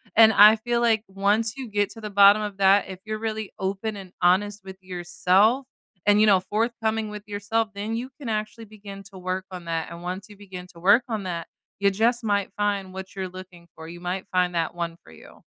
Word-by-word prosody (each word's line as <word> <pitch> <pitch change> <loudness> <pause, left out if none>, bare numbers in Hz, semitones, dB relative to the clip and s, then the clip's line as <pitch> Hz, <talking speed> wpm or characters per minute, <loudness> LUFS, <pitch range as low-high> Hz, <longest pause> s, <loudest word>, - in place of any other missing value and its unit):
And 220 -1 +7
I 210 +2 +8
feel 240 +1 -1
like 225 -2 +2
once 205 +3 +1
you 260 -4 -7
get 205 -1 0
to 225 - -11
the 210 - -5
bottom 200 +1 +6
of 205 -2 -5
that, 195 +1 +4
if 190 -1 -8
you're 215 0 -3
really 220 -1 -4
open 200 +3 -3
and 190 -2 -10
honest 205 +4 +2
with 190 0 -9
yourself 185 +7 +1 0.4
and, 205 0 +5
you 215 - +5
know, 195 -3 +5
forthcoming 220 +1 -1
with 210 -1 -8
yourself, 210 +2 -1
then 210 +3 -4
you 250 +3 -4
can 270 - -7
actually 215 +1 -3
begin 200 -2 -11
to 190 - -10
work 185 +1 -3
on 180 -2 -8
that, 165 -1 -3
and 170 +1 -10
once 185 +2 -5
you 205 - -13
begin 185 -3 -10
to 170 - -14
work 205 +7 +5
on 220 -4 -3
that, 170 -3 -4 0.3
you 200 - +4
just 230 +4 +1
might 200 -2 0
find 200 -2 -1
what 190 0 -8
you're 190 -1 -4
looking 180 -2 -12
for. 160 0 -10
You 175 +1 -9
might 180 +2 -3
find 180 -1 +1
that 165 0 -1
one 170 -1 -4
for 80 - -17
you. 80 - -16
200 Hz, 225 wpm, -24 LUFS, 185-215 Hz, 0.4 s, I